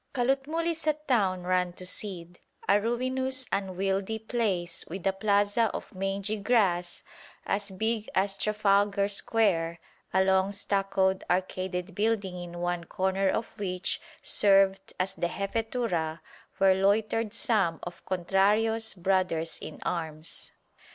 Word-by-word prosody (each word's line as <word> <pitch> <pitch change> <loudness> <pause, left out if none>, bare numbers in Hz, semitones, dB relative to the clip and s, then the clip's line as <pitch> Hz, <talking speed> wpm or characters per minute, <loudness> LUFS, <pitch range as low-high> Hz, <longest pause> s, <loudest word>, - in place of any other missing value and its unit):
Calotmul 270 +6 0
is 325 -2 0
a 305 - +5
town 220 -12 0
run 180 -1 +1
to 185 - -8
seed, 175 -3 -3 0.3
a 205 +1 +4
ruinous 260 +3 -1
unwieldy 195 +2 -1
place 210 -6 -1
with 185 +2 -7
a 195 - +3
plaza 205 +2 +2
of - - -7
mangy 195 +2 -2
grass 195 -5 +1 0.4
as 200 0 -1
big 220 +3 -2
as 195 +1 +2
Trafalgar 200 -1 +2
Square, 195 -5 +1 0.3
a 190 +1 +4
long 190 +1 +3
stuccoed, 195 -1 +1
arcaded 185 0 -1
building 205 -2 0
in 175 0 -7
one 175 -1 -1
corner 190 +2 0
of 225 - -1
which 185 -2 -1 0.2
served 195 -8 +3
as 190 +1 0
the 175 -2 -1
Jefetura 195 -5 -2 0.4
where 195 -1 +5
loitered 210 +3 +1
some 205 -7 +1
of 175 0 -8
Contrario's 205 +5 +2
brothers 180 -3 0
in - - -7
arms. 160 -2 -4
195 Hz, 125 wpm, -28 LUFS, 185-220 Hz, 0.4 s, a